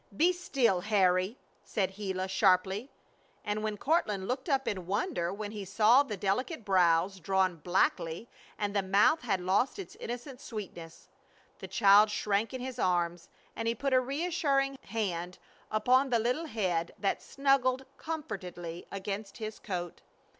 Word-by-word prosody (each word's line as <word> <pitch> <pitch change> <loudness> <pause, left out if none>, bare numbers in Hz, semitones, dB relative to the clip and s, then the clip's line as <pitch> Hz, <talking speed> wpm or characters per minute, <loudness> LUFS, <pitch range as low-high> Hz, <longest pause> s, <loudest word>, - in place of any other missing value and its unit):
"Be 350 +6 +4
still, 260 - +1
Harry!" 190 +1 +2 0.3
said 190 -2 -1
Gila, 190 -2 -2
sharply, 190 +4 +2 0.6
and 210 0 -1
when 215 -1 -2
Courtland 210 - 0
looked 260 +5 -3
up 270 -2 +1
in 185 -4 -3
wonder 185 -4 -1
he 205 0 -6
saw 215 +7 +5
the 220 -8 -4
delicate 220 - -1
brows 185 0 +3
drawn 185 0 +1
blackly, 175 +1 0 0.3
and 205 -1 -2
the 200 - +3
mouth 200 +11 +3
had 210 -6 0
lost 195 - +1
its 390 - -8
innocent 250 +3 -7
sweetness. 175 -9 -8 0.5
The - - -7
child 205 -1 +6
shrank 210 +1 0
in 260 -1 -5
his 255 -1 -6
arms, 175 -2 0 0.3
and 225 - -3
he 230 - +1
put 275 +3 -1
a 255 - +6
reassuring 275 -1 0
hand 180 -5 -3 0.3
upon 255 +5 +3
the 240 - +3
little 250 +8 0
head 180 - -1
that 200 - -1
snuggled 270 -1 +1
comfortedly 180 - -6
against 195 +1 -5
his 215 -1 -6
coat. 175 -4 -5
210 Hz, 145 wpm, -30 LUFS, 185-255 Hz, 0.6 s, child